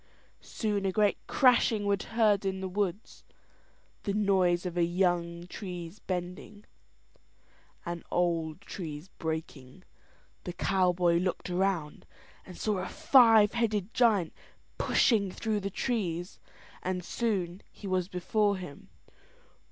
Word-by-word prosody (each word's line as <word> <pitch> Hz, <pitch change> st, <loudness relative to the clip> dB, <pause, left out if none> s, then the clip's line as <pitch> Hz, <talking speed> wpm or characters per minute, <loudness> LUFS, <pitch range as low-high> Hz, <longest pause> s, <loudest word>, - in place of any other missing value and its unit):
Soon 210 Hz, -3 st, -2 dB
a -, -, +1 dB
great 205 Hz, +1 st, +2 dB
crashing 235 Hz, -5 st, +3 dB
was 200 Hz, 0 st, +1 dB
heard 215 Hz, -3 st, +2 dB
in 190 Hz, -1 st, -2 dB
the 190 Hz, -, -3 dB
woods, 195 Hz, +1 st, -3 dB, 0.8 s
the 200 Hz, -2 st, -2 dB
noise 190 Hz, -4 st, +2 dB
of 180 Hz, -1 st, -4 dB
young 175 Hz, -1 st, 0 dB
trees 180 Hz, -1 st, -7 dB
bending, 180 Hz, +3 st, -6 dB, 1.2 s
and 170 Hz, -1 st, -5 dB
old 170 Hz, -1 st, 0 dB
trees 160 Hz, -1 st, -7 dB
breaking. 160 Hz, -1 st, -5 dB, 0.6 s
The 180 Hz, -, -5 dB
cowboy 180 Hz, -2 st, +2 dB
looked 180 Hz, 0 st, -2 dB
around 180 Hz, -5 st, -1 dB, 0.4 s
and 185 Hz, -, -10 dB
saw 210 Hz, -3 st, -1 dB
a 185 Hz, -, -3 dB
five 235 Hz, -9 st, +6 dB
headed 220 Hz, -3 st, -1 dB
giant 210 Hz, -9 st, +3 dB, 0.5 s
pushing 210 Hz, -5 st, +3 dB
through 215 Hz, +2 st, -2 dB
the 200 Hz, 0 st, -3 dB
trees; 185 Hz, -6 st, -2 dB, 0.4 s
and 180 Hz, -1 st, -3 dB
soon 195 Hz, -5 st, -2 dB
he -, -, -13 dB
was 185 Hz, -2 st, 0 dB
before 200 Hz, +2 st, 0 dB
him. 180 Hz, -6 st, -10 dB
185 Hz, 120 wpm, -29 LUFS, 175-210 Hz, 1.2 s, five